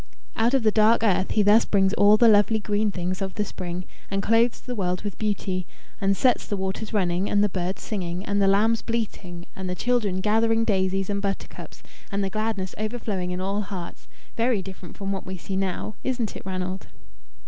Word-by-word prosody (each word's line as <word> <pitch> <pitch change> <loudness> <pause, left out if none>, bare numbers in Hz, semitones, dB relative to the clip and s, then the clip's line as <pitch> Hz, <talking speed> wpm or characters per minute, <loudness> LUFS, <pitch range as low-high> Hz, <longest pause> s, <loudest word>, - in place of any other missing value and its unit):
Out 235 +4 +2
of 265 - +2
the 215 - +4
dark 220 +2 +4
earth 190 -3 +2
he 210 - +3
thus 210 +3 +6
brings 195 -1 +2
all 205 0 +6
the 235 - +6
lovely 215 +1 +5
green 210 0 0
things 185 +1 -3
of 190 -1 -3
the 210 - 0
spring, 180 -2 -5 0.2
and 195 0 -1
clothes 230 +2 +3
the 250 - -6
world 180 -4 -1
with 205 -2 -5
beauty, 195 -4 -1 0.3
and 195 0 +2
sets 255 -3 +2
the 205 - -2
waters 190 +3 -3
running, 185 -2 0
and 205 0 +3
the 210 - +2
birds 185 0 -3
singing, 180 -3 -3
and 200 0 0
the 195 - +4
lambs 215 +4 +3
bleating, 200 -7 -4
and 190 -1 -5
the 180 - -2
children 220 -5 0
gathering 225 +3 +2
daisies 190 -3 +1
and 200 0 -1
butter 200 -1 -2
cups, - - -11 0.3
and 200 0 0
the 195 - -2
gladness 215 -3 -2
overflowing 215 -4 -2
in 180 0 -3
all 200 +2 -1
hearts 190 -4 -7 0.3
very 230 -4 +1
different 190 -2 -10
from 195 -1 -3
what 195 - -3
we 185 0 -6
see 190 +2 -5
now 190 +2 -2
isn't 245 -5 -2
it, - - -6
Ranald?" 185 0 -4
200 Hz, 205 wpm, -25 LUFS, 190-215 Hz, 0.3 s, thus